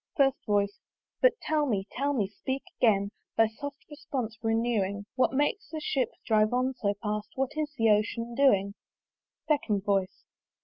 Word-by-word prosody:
FIRST 270 Hz, -2 st, +3 dB
VOICE. 200 Hz, -1 st, +1 dB, 0.4 s
"But -, -, +6 dB
tell 305 Hz, -1 st, +1 dB
me, 200 Hz, -6 st, 0 dB
tell 280 Hz, +2 st, 0 dB
me! 225 Hz, -9 st, +1 dB
speak 265 Hz, +7 st, -4 dB, 0.2 s
again, 200 Hz, -4 st, +3 dB, 0.3 s
"Thy 225 Hz, -, +6 dB
soft 280 Hz, +5 st, -8 dB
response 280 Hz, -7 st, -4 dB
renewing 225 Hz, -3 st, 0 dB
"What 255 Hz, -, +3 dB
makes 295 Hz, +10 st, 0 dB
that 310 Hz, -1 st, -5 dB
ship 260 Hz, -4 st, +1 dB, 0.2 s
drive 215 Hz, 0 st, +3 dB
on 255 Hz, +1 st, +1 dB
so 205 Hz, -5 st, -1 dB
fast? 210 Hz, 0 st, -2 dB
"What 265 Hz, 0 st, 0 dB
is 305 Hz, -1 st, -2 dB
the 225 Hz, -1 st, +4 dB
Ocean 230 Hz, +3 st, 0 dB
doing?" 200 Hz, -7 st, +3 dB, 0.7 s
SECOND 220 Hz, -10 st, +1 dB
VOICE. 195 Hz, -2 st, 0 dB
230 Hz, 160 wpm, -29 LUFS, 205-275 Hz, 0.7 s, But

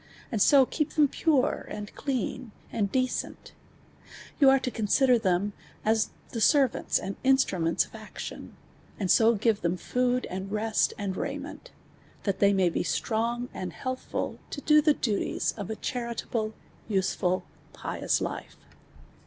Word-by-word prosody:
and 220 Hz, -4 st, -1 dB
so 275 Hz, +3 st, +7 dB
keep 305 Hz, +3 st, -2 dB
them 300 Hz, -2 st, +5 dB
pare, 280 Hz, -2 st, +1 dB
and 210 Hz, 0 st, -7 dB
clean, 255 Hz, -2 st, -3 dB, 0.2 s
ami 210 Hz, -3 st, +1 dB
decent; 255 Hz, +4 st, -2 dB, 0.9 s
v<ni 275 Hz, -3 st, +7 dB
are 270 Hz, -, +5 dB
to 250 Hz, -, -3 dB
consider 245 Hz, +3 st, +3 dB
them 200 Hz, 0 st, +1 dB, 0.3 s
as 220 Hz, 0 st, +2 dB, 0.2 s
the 230 Hz, -, -3 dB
servants 275 Hz, +1 st, +3 dB
and 195 Hz, -, -5 dB
instrninents 195 Hz, -11 st, +2 dB
of -, -, -21 dB
action, -, -, -8 dB, 0.4 s
and 190 Hz, -4 st, +1 dB
so 230 Hz, +1 st, +5 dB
{•ivt* 205 Hz, -, -7 dB, 0.2 s
tin 175 Hz, +1 st, 0 dB
in -, -, -19 dB, 0.4 s
lood. 250 Hz, -, -2 dB
and 190 Hz, +2 st, -5 dB
rest, 215 Hz, +1 st, +1 dB
and 200 Hz, -3 st, -3 dB
raiment, -, -, -5 dB, 0.5 s
tiiat 200 Hz, -, +1 dB
tliey 200 Hz, 0 st, +4 dB
may 185 Hz, -2 st, +3 dB
/ -, -, -7 dB
be -, -, -1 dB
slron;;aml 235 Hz, -3 st, -2 dB
heailhCid 255 Hz, -1 st, -4 dB
todo 300 Hz, +1 st, +3 dB
tliethities 220 Hz, -8 st, -1 dB
ol" 200 Hz, +1 st, -4 dB
a -, -, -2 dB
charilahie, 235 Hz, -2 st, -3 dB
^ -, -, -23 dB, 0.4 s
usel'nl. 190 Hz, -2 st, 0 dB, 0.3 s
pious -, -, -1 dB
life. -, -, -5 dB
225 Hz, 145 wpm, -28 LUFS, 200-255 Hz, 0.9 s, so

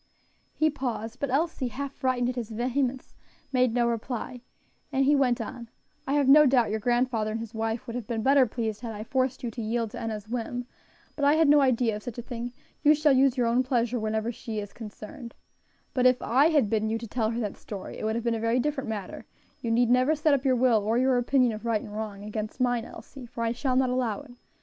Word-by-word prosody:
He 310 Hz, 0 st, +2 dB
paused; 245 Hz, -4 st, -4 dB
but, 280 Hz, -, -2 dB
Elsie, 285 Hz, -1 st, 0 dB
half 275 Hz, +3 st, -5 dB
frightened 250 Hz, -2 st, 0 dB
at 250 Hz, -, -3 dB
his 235 Hz, -3 st, -4 dB
vehemence, 250 Hz, +3 st, -2 dB, 0.4 s
made 255 Hz, -2 st, +3 dB
no 240 Hz, -1 st, +3 dB
reply; 235 Hz, +1 st, -4 dB, 0.5 s
and 270 Hz, -1 st, +2 dB
he 290 Hz, +2 st, +5 dB
went 255 Hz, -4 st, +2 dB
on: 235 Hz, +1 st, -6 dB, 0.4 s
"I 275 Hz, -, 0 dB
have 285 Hz, -2 st, +2 dB
no 300 Hz, +2 st, +8 dB
doubt 245 Hz, -5 st, +3 dB
your 220 Hz, -, -1 dB
grandfather 240 Hz, -1 st, +1 dB
and 220 Hz, +1 st, -3 dB
his 230 Hz, 0 st, -7 dB
wife 225 Hz, +1 st, -2 dB
would 230 Hz, -, -6 dB
have 240 Hz, -4 st, -5 dB
been 225 Hz, -2 st, -2 dB
better 270 Hz, 0 st, +5 dB
pleased 220 Hz, -2 st, -3 dB
had 230 Hz, -3 st, -5 dB
I 210 Hz, -, -5 dB
forced 260 Hz, +2 st, -1 dB
you 235 Hz, -, -2 dB
to 230 Hz, -, -6 dB
yield 225 Hz, 0 st, -1 dB
to -, -, -7 dB
Enna's 215 Hz, -2 st, -4 dB
whim; 245 Hz, +1 st, -3 dB, 0.5 s
but 290 Hz, -, -4 dB
I 285 Hz, +2 st, +5 dB
had 320 Hz, -1 st, +4 dB
no 290 Hz, 0 st, +6 dB
idea 245 Hz, -4 st, +2 dB
of -, -, -10 dB
such 240 Hz, +1 st, -7 dB
a 240 Hz, -, -5 dB
thing; 240 Hz, 0 st, -5 dB, 0.3 s
you 300 Hz, 0 st, +6 dB
shall 300 Hz, -1 st, +3 dB
use 265 Hz, 0 st, +3 dB
your 245 Hz, -, +2 dB
own 235 Hz, +2 st, +3 dB
pleasure 245 Hz, -2 st, 0 dB
whenever 220 Hz, +1 st, -1 dB
she 225 Hz, -1 st, -6 dB
is 205 Hz, -1 st, -5 dB
concerned; 225 Hz, +2 st, -9 dB, 0.6 s
but: 255 Hz, -1 st, +4 dB
if 255 Hz, 0 st, +3 dB
I 265 Hz, +7 st, +3 dB
had 295 Hz, -8 st, +3 dB
bidden 215 Hz, +1 st, 0 dB
you 225 Hz, -, 0 dB
to 230 Hz, 0 st, -7 dB
tell 220 Hz, 0 st, -1 dB
her 230 Hz, +1 st, -2 dB
that 210 Hz, -4 st, -3 dB
story 200 Hz, -3 st, -8 dB
it -, -, -6 dB
would 220 Hz, +1 st, 0 dB
have 235 Hz, -, -2 dB
been 235 Hz, -1 st, +1 dB
a 225 Hz, -, -2 dB
very 230 Hz, +2 st, +1 dB
different 275 Hz, -1 st, -2 dB
matter; 205 Hz, -4 st, -6 dB, 0.3 s
you 235 Hz, -, -3 dB
need 235 Hz, +1 st, +3 dB
never 255 Hz, +5 st, +4 dB
set 305 Hz, 0 st, +2 dB
up 275 Hz, -2 st, +1 dB
your 260 Hz, -2 st, +3 dB
will, 240 Hz, -3 st, +3 dB
or 220 Hz, +3 st, +1 dB
your 255 Hz, 0 st, +3 dB
opinion 250 Hz, 0 st, +3 dB
of 215 Hz, 0 st, -7 dB
right 230 Hz, -2 st, +1 dB
and 210 Hz, -, -9 dB
wrong, 210 Hz, -2 st, -5 dB
against 215 Hz, +2 st, -5 dB
mine, 245 Hz, -2 st, +1 dB
Elsie, 265 Hz, -4 st, -11 dB
for 230 Hz, 0 st, -5 dB
I 230 Hz, -, +1 dB
shall 255 Hz, +2 st, -1 dB
not 255 Hz, -1 st, +2 dB
allow 245 Hz, -5 st, -1 dB
it. 285 Hz, -3 st, -14 dB
240 Hz, 245 wpm, -27 LUFS, 225-260 Hz, 0.6 s, no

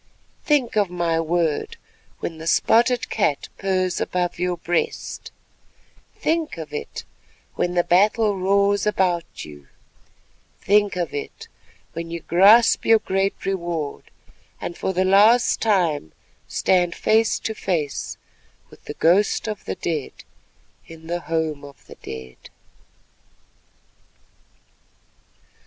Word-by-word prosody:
Think 285 Hz, -8 st, +1 dB
of 205 Hz, -3 st, +2 dB
my 170 Hz, -2 st, 0 dB
word 165 Hz, -2 st, -1 dB, 0.4 s
when 165 Hz, -1 st, -5 dB
the 160 Hz, -, -7 dB
spotted 240 Hz, +7 st, +2 dB
cat 200 Hz, -10 st, 0 dB
purrs 185 Hz, -2 st, 0 dB
above 180 Hz, -1 st, -2 dB
your 180 Hz, 0 st, -1 dB
breast; 175 Hz, 0 st, -3 dB, 0.9 s
think 325 Hz, -, -1 dB
of 160 Hz, -2 st, -8 dB
it 150 Hz, -, -6 dB, 0.5 s
when 175 Hz, 0 st, -2 dB
the 175 Hz, -, +3 dB
battle 210 Hz, +4 st, +3 dB
roars 200 Hz, +2 st, +2 dB
about 180 Hz, -5 st, -1 dB
you; 75 Hz, -2 st, -13 dB, 0.9 s
think 205 Hz, 0 st, +2 dB
of 175 Hz, -3 st, -3 dB
it 145 Hz, -, -6 dB, 0.5 s
when 165 Hz, +1 st, -6 dB
you 170 Hz, 0 st, -4 dB
grasp 205 Hz, +9 st, +5 dB
your 225 Hz, -, +6 dB
great 195 Hz, -1 st, -2 dB
reward, 170 Hz, -6 st, -3 dB, 0.5 s
and 175 Hz, -, -5 dB
for -, -, -2 dB
the 185 Hz, 0 st, 0 dB
last 210 Hz, +6 st, +4 dB
time 170 Hz, -, +1 dB, 0.3 s
stand 175 Hz, -2 st, +1 dB
face 220 Hz, 0 st, +2 dB
to 220 Hz, -, -4 dB
face 165 Hz, -9 st, -3 dB, 0.5 s
with -, -, -18 dB
the -, -, -7 dB
ghost 190 Hz, +7 st, +2 dB
of 210 Hz, -2 st, -5 dB
the -, -, -3 dB
dead 155 Hz, -5 st, -3 dB, 0.7 s
in 165 Hz, 0 st, -13 dB
the 175 Hz, +1 st, -2 dB
Home 160 Hz, -4 st, -2 dB
of 140 Hz, -4 st, -14 dB
the -, -, -13 dB
Dead. 65 Hz, -1 st, -10 dB
180 Hz, 120 wpm, -22 LUFS, 165-205 Hz, 0.9 s, your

